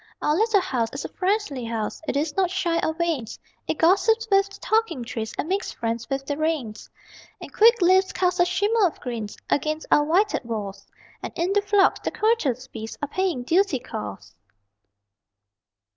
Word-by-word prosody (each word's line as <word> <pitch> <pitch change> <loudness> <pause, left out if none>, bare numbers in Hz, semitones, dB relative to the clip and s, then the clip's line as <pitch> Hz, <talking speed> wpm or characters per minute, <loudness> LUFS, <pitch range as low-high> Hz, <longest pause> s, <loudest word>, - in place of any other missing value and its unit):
Our 300 - +1
little 435 +1 +3
house 250 -11 -1
is 275 - -5
a - - -5
friendly 370 - -1
house. 225 -2 -4
It - - 0
is 300 +1 -1
not 380 -2 +2
shy 355 -3 0
or 315 - -1
vain; 330 -7 -1 0.4
It - - -1
gossips 445 +7 +3
with 395 0 +4
the 395 - -13
talking 435 - 0
trees, 225 -2 -5
And - - -2
makes 390 +4 -1
friends 230 0 -4
with 270 0 -2
the 285 +1 -3
rain. 310 -9 -1 0.7
And - - -10
quick 465 +2 +6
leaves 375 +2 +4
cast 360 -1 0
a 350 - +6
shimmer 410 +3 +2
of 330 - -8
green 235 -4 -4 0.2
Against 310 +2 -1
our 295 - +5
whited 365 +6 +1
walls, 200 -4 -5 0.3
And - - -5
in 355 +3 0
the 410 - +3
phlox, 405 -1 +3
the - - -2
courteous 300 - 0
bees 225 -4 -8
Are - - 0
paying 345 -5 -1
duty 345 +2 +2
calls. 105 - -7
330 Hz, 180 wpm, -24 LUFS, 250-390 Hz, 0.7 s, quick